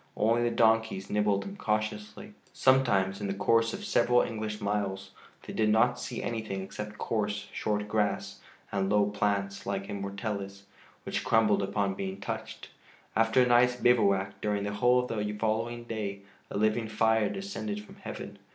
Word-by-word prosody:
Only 115 +2 +3
the - - -5
donkey 110 -3 +3
nibbled 105 -1 +1
them 195 - -7
cautiously. 105 - -3 0.2
Sometimes 100 -7 +3
in 100 - -2
the 95 - -2
course 115 +3 +3
of 205 - -6
several 125 -8 +3
English 110 -2 -4
miles 100 -2 -2 0.3
they - - -7
did 110 -1 +2
not 120 +3 +3
see 125 -1 -5
anything 110 -4 -3
except 105 +2 -7
coarse, 105 -2 -2
short 105 -1 -1
grass 105 -1 -1 0.3
and 95 -1 0
low 105 0 +4
plants, 100 -1 -1
like 100 0 -3
immortelles, 100 0 -4 0.4
which - - -2
crumbled 110 -5 +3
upon 100 0 0
being 95 0 -5
touched. 100 - -6 0.5
After 115 +3 +4
a - - +3
night's 120 0 +5
bivouac, 100 -6 +2
during 105 -1 0
the 100 0 -3
whole 125 +3 +4
of 125 - -5
the 105 -2 -2
following 115 +2 -1
day 105 -4 -4 0.3
a - - -4
living 110 +2 +1
fire 110 0 +2
descended 205 +2 -5
from 195 0 -15
heaven. 100 - -8
105 Hz, 160 wpm, -29 LUFS, 100-115 Hz, 0.5 s, night's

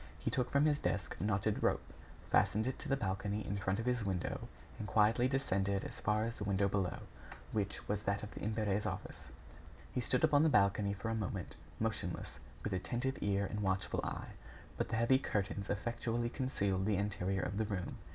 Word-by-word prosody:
He - - -2
took 125 -1 +1
from 140 +1 +4
his 150 -2 +3
desk 100 - -1
a - - -2
knotted 105 0 +1
rope, - - +1 0.4
fastened 110 +2 +4
it 130 - -2
to - - -5
the 135 - +3
balcony 105 0 -1
in 100 - -2
front 95 0 0
of 115 - -2
his 125 -2 +1
window, 95 -3 -2 0.3
and 105 - -3
quietly 110 +5 +4
descended 100 -7 +1
as - - -7
far 105 +1 +2
as 115 +1 -3
the - - -4
window 100 0 +2
below, 95 -2 -1 0.5
which 100 -2 -1
was 105 0 0
that 100 0 -1
of 105 - -6
the - - -11
of - - -2
Imbert's 105 -1 +1
office. - - -6 0.7
He 125 - 0
stood 125 +1 +1
upon 145 -1 +6
the 160 - +5
balcony 100 -3 +3
for 100 +3 -4
a - - +1
moment, 105 -4 -3 0.2
motionless, - - -2 0.2
with 105 - -2
attentive 120 +8 -1
ear 100 0 +2
and 105 +2 -3
watchful 95 -2 0
eye, - - -4 0.5
but - - -1
the 110 - 0
heavy 115 +4 +4
curtains 100 -4 -2
effectually 120 +2 -1
concealed 100 -8 0
the 105 - +3
interior 95 -1 0
of 100 - -2
the 110 - +2
room. 105 +4 -3
105 Hz, 200 wpm, -36 LUFS, 100-120 Hz, 0.7 s, upon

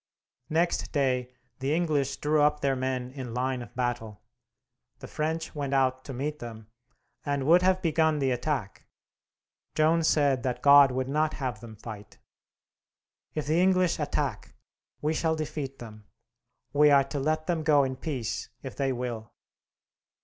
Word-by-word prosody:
Next 170 +2 0
day 130 -4 0 0.3
the 135 +3 0
English 145 -5 0
drew 150 0 +1
up 150 0 +3
their 135 -1 +1
men 130 -1 -2
in 130 -4 -7
line 130 0 -1
of 120 +1 -11
battle. 120 -5 -3 0.7
The - - -10
French 160 +1 -3
went 140 -2 -2
out 130 -1 +1
to - - -6
meet 145 +4 -3
them, 110 -2 -8 0.6
and 140 -2 -1
would 170 +4 +6
have 185 0 +2
begun 160 -1 +2
the 135 -2 +1
attack. 125 -4 -3 0.9
Joan 160 +2 +3
said 140 -5 +3
that 125 -1 -3
God 140 -1 +8
would 130 0 -2
not 155 +3 0
have 125 -6 -3
them 115 -2 -10
fight. 105 -1 -10 1.2
"If 155 - -2
the 160 +4 +2
English 185 -1 +3
attack, - - -2 0.5
we 155 +1 +1
shall 160 0 0
defeat 150 -3 -5
them; 110 -3 -11 0.7
we 150 +1 +6
are 140 -1 +6
to 135 +1 -5
let 155 +3 0
them 170 -3 0
go 150 -2 +4
in 130 -1 -2
peace 130 -6 -4
if - - -7
they 135 -1 0
will." 120 -3 -4
140 Hz, 155 wpm, -28 LUFS, 125-155 Hz, 1.2 s, God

